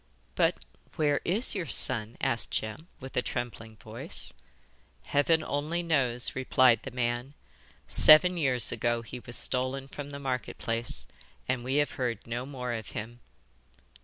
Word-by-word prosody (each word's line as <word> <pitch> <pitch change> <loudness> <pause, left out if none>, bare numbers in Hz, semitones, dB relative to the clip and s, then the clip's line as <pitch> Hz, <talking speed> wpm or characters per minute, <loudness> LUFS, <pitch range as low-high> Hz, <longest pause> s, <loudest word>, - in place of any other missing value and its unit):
'But - - +2 0.4
where 145 -2 +1
is 210 +9 +2
your 185 -5 -3
son?' 115 -4 +2
asked 115 - 0
Jem, 110 +10 -4
with 130 0 -10
a - - +2
trembling 115 -3 -5
voice. 95 - -8 0.7
'Heaven 155 - +2
only 155 +5 -2
knows!' 130 -7 +2
replied 130 -3 +3
the - - -7
man; 120 +2 -3 0.5
'seven 180 +4 +7
years 135 -7 +5
ago 120 0 -1
he 125 +2 -8
was 120 0 -8
stolen 130 +1 0
from 145 +1 -8
the 140 - -7
market 130 -3 -4
place, 115 +1 -2 0.4
and 125 -1 -1
we 130 +2 -2
have 145 0 +2
heard 120 -4 -2
no 120 +2 -4
more 125 -3 -4
of 110 -2 -5
him. 115 +3 -7
130 Hz, 150 wpm, -29 LUFS, 120-145 Hz, 0.7 s, seven